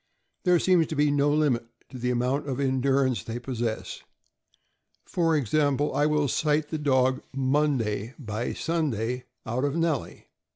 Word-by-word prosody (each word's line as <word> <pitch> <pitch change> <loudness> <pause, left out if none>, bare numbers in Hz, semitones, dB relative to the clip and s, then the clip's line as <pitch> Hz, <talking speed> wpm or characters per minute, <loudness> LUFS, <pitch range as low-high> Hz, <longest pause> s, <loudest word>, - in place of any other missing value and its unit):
There 180 -1 +5
seems 175 -2 +3
to 155 - -4
be 145 0 +3
no 145 0 +2
limit 145 -6 +1 0.2
to 130 - -9
the 125 +1 -1
amount 125 +4 0
of 130 0 -2
endurance 130 -1 +1
they 115 +1 -5
possess. 120 -3 -4 1.0
For 165 -2 +1
example, 145 +2 +1
I 145 - +2
will 150 -1 +2
cite 150 +2 +1
the 155 - -3
dog 130 -2 +2
Monday, 130 -5 0
by 115 -3 -4
Sunday, 125 -7 -2 0.2
out 120 +4 -2
of 145 +1 0
Nellie. 165 -5 -1
140 Hz, 150 wpm, -26 LUFS, 125-150 Hz, 1.0 s, There